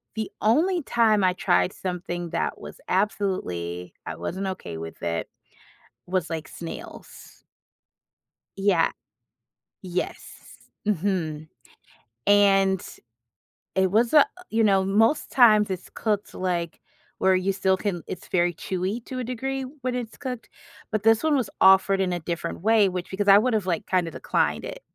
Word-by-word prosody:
The 220 -1 -3
only 335 - +3
time 220 -5 +3
I 185 - +3
tried 180 0 +1
something 175 -1 -4
that - - -2
was - - -10
absolutely, 135 - -2
I - - -5
wasn't 190 +2 -4
okay 185 - -5
with 80 0 -8
it, 85 -1 -2 0.8
was 180 -2 -1
like 160 -1 -5
snails. 165 - -10 1.2
Yeah. 195 -4 +3 0.9
Yes. 180 -1 -3 0.6
Mhm. 170 -6 -1 0.8
And 195 -2 +4 0.9
it 190 -1 +2
was 230 +5 +2
a 300 - +9
uh, - - +8 0.3
you 225 0 +2
know, 195 -2 +4
most 225 +10 +2
times 215 -5 +6
it's 185 -2 -5
cooked 210 -2 -2
like 175 -3 -2 0.4
where 190 0 +3
you 185 +1 0
still 190 -1 +1
can 185 -6 -3
it's - - -7
very 175 -1 +1
chewy 190 +7 -3
to 255 - -5
a - - -2
degree 265 +2 -3 0.2
when 250 0 -2
it's 235 -3 -5
cooked 250 -3 -6 0.4
but 215 -2 -1
this 225 +3 +4
one 315 -2 +3
was 250 -7 0
offered 190 0 +6
in 180 -2 0
a 175 - -2
different 170 0 -4
way, 215 -1 +4
which 180 -1 -5
because 200 +1 -2
I 195 - +9
would've 220 -3 +1
like 175 -3 -1
kind 180 -2 +1
of 165 - -7
declined - - 0
it. - - -7
195 Hz, 150 wpm, -25 LUFS, 180-220 Hz, 1.2 s, a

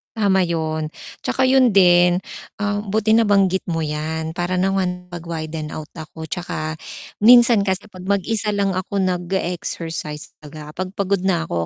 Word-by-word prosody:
Tama 190 -4 +3
yun. 160 -2 -2 0.4
Tsaka - - 0
yun 260 -2 +5
din, 175 -1 +5 0.4
ah, 205 0 0
buti 215 +1 0
nabanggit 195 -4 +3
mo 165 -1 -1
'yan 160 +1 -3
para 175 +1 -2
naman 180 -1 -1
mag-widen 160 -2 -5
out 155 -1 -7
ako, 160 0 -8
tsaka 155 -3 -4 0.5
minsan 235 -2 +7
kasi 190 +1 -1
'pag 185 -1 -11
mag-isa 210 +2 0
lang 200 -1 +1
ako 185 +2 -3
nag-e-exercise, 175 -4 -3
baga 150 0 -10
'pag 185 +1 -5
pagod 200 0 0
na 175 -4 +2
'ko 85 - -2
180 Hz, 145 wpm, -21 LUFS, 160-200 Hz, 0.5 s, minsan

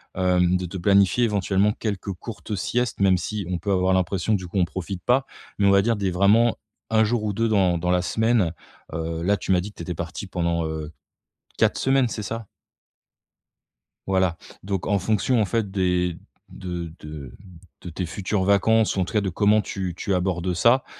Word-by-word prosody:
hem, 90 -1 +2
de 90 - -4
te 90 +2 -6
planifier 100 +4 +3
éventuellement 100 -1 +1
quelques 100 -3 -4
courtes 105 +3 -7
siestes? 120 +5 -1
Même 95 -2 +5
si 105 +2 -4
on 90 - -1
peut 100 +4 -2
avoir 95 0 +2
l'impression 95 +3 0
du 95 -3 -1
coup 85 - -5
on 90 - +4
profite 95 +1 -6
pas, 130 +2 +2 0.3
mais 100 - +4
on - - +6
va 100 0 +5
dire 115 +2 +1
des 100 -3 -1
vraiment 105 +6 +4 0.3
1 110 0 +4
jour 110 0 0
ou 105 - -1
2 115 +3 +1
dans 95 -5 +3
dans 90 +1 -1
la 90 0 +3
semaine, 110 -2 +1 0.4
heu, 80 +1 -3
là 100 +3 +2
tu - - -3
m'as 90 -1 +4
dit 100 - -6
que - - -31
tu - - -6
étais 90 +1 -4
parti 85 +5 -6
pendant, 85 -2 -1
heu, 80 -1 -5 0.7
4 - - +2
semaines, 135 -1 +3
c'est 110 - -4
ça? 115 0 -5 1.6
Voilà, 95 -3 +1 0.3
donc 95 -1 -3
en 100 - +2
fonction 110 +4 +1
en - - +3
fait 105 +2 -1
des 90 -3 0 0.3
de 85 -3 -6
de 75 -4 -8 0.5
de 90 - -8
tes 90 +2 -4
futures 95 +2 -2
vacances 105 +3 +3
ou - - +1
en - - +2
tout - - -9
cas 105 - +4
de 100 -2 -2
comment 105 +4 +3
tu 95 -3 -4
tu 95 - -1
abordes 90 0 -1
ça, 120 +9 +4
95 Hz, 205 wpm, -24 LUFS, 90-105 Hz, 1.6 s, on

